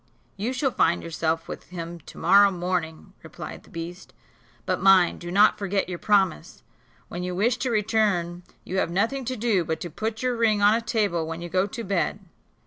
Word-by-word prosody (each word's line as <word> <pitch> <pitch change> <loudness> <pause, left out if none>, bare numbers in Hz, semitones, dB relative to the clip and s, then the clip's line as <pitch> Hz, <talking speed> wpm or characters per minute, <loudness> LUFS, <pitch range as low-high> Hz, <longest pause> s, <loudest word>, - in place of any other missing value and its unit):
"You 215 +5 -2
shall 265 +1 0
find 170 -6 +1
yourself 165 0 -2
with - - -8
him 170 -1 -7
to - - -14
morrow 200 +4 +6
morning," 175 -3 -3
replied - - -9
the - - -21
beast; 170 +2 -8 0.5
"but - - -1
mind, 190 -3 +5
do 175 - -7
not 200 +4 +4
forget 200 -1 -1
your 175 -2 -5
promise. 195 - +1 0.4
When 175 - -6
you 180 0 -3
wish 230 +6 +1
to 255 - -2
return 205 -6 0 0.2
you 190 - -4
have - - 0
nothing 230 +9 -1
to 255 +2 -2
do 215 -6 +1
but 160 0 -3
to 175 - -5
put 220 +7 -4
your 250 -1 +1
ring 225 -3 +2
on 205 +1 +5
a 230 - +1
table 205 -8 0
when 165 +1 -5
you 175 - -6
go 185 +3 +1
to 235 0 -6
bed. 195 0 -1
190 Hz, 200 wpm, -25 LUFS, 175-220 Hz, 0.5 s, morrow